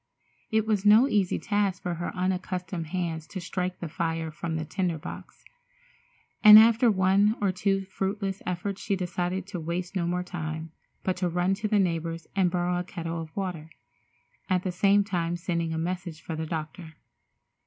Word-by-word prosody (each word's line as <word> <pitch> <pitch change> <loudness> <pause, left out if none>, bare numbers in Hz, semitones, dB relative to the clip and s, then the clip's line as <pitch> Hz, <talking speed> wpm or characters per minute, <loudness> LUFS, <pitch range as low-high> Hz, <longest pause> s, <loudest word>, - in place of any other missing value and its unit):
It 220 0 +2
was 210 -3 +1
no 215 +5 +7
easy 200 -7 +1
task 205 -3 -1
for 175 - -1
her 170 +1 -4
unaccustomed 180 -2 -2
hands 165 -2 -3
to 190 - -6
strike 180 +1 -3
the 170 - -4
fire 165 0 -2
from 160 +1 -4
the 160 0 -2
tinder 175 +1 -1
box, 150 - -10 1.0
and 210 -1 +12
after 230 +2 +6
one 200 +2 +3
or 200 -2 +2
two 195 +1 0
fruitless 195 0 -3
efforts 185 +2 -3
she 200 - 0
decided 180 0 -2
to 195 -2 -6
waste 175 +3 -4
no 175 -3 0
more 180 +1 -1
time, 160 -2 -5 0.3
but 185 -1 -1
to 180 -1 0
run 175 +2 +1
to 215 +2 -2
the 210 0 +2
neighbor's 165 -3 -1
and 190 -3 +3
borrow 175 0 0
a - - -2
kettle 170 -2 -5
of 160 +2 -10
water, 180 -5 -4 0.8
at 185 -1 +2
the 185 - -1
same 200 +3 +4
time 175 -4 -1
sending 170 -1 -2
a 160 - -2
message 175 -1 -3
for 160 0 -6
the 160 0 -4
doctor. 160 0 -6
180 Hz, 180 wpm, -27 LUFS, 165-195 Hz, 1.0 s, and